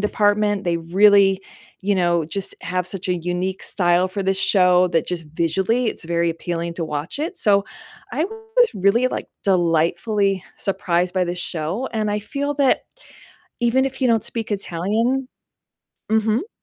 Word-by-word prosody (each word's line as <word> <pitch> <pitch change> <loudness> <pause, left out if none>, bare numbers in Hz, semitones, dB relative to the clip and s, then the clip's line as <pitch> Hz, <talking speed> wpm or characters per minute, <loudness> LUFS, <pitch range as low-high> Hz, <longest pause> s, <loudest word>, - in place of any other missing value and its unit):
department, 205 0 +1
they 170 -1 +1
really, 195 +3 +4 0.4
you 200 +1 +1
know, 175 -2 +2
just 195 +3 -4
have 180 +1 -2
such 185 0 -4
a 180 - +1
unique 180 +2 -3
style 175 -1 +2
for 195 +2 -4
this 190 0 0
show 180 -2 +4
that 165 -2 0
just 170 -3 -4
visually 190 +10 +1
it's 220 - -3
very 170 0 +1
appealing 170 0 -4
to 170 -1 -3
watch 150 - -4
it, 325 +5 -3
so 200 -2 +3 0.5
I 315 - 0
was 445 +4 +1
really, 205 +6 +3
like, - - -4 0.2
delightfully 185 +3 +1
surprised 180 -2 0
by 185 -1 +2
this 175 0 -4
show, 175 +9 -3
and 215 -1 -1
I 210 0 -1
feel 285 +5 -3
that 275 -2 +3 0.8
even 240 +3 +3
if 265 0 -6
you - - +4
don't 225 -3 +3
speak 225 -2 -4
Italian 215 +8 -1 0.9
Mhm. 220 - +1
195 Hz, 160 wpm, -21 LUFS, 175-220 Hz, 0.9 s, really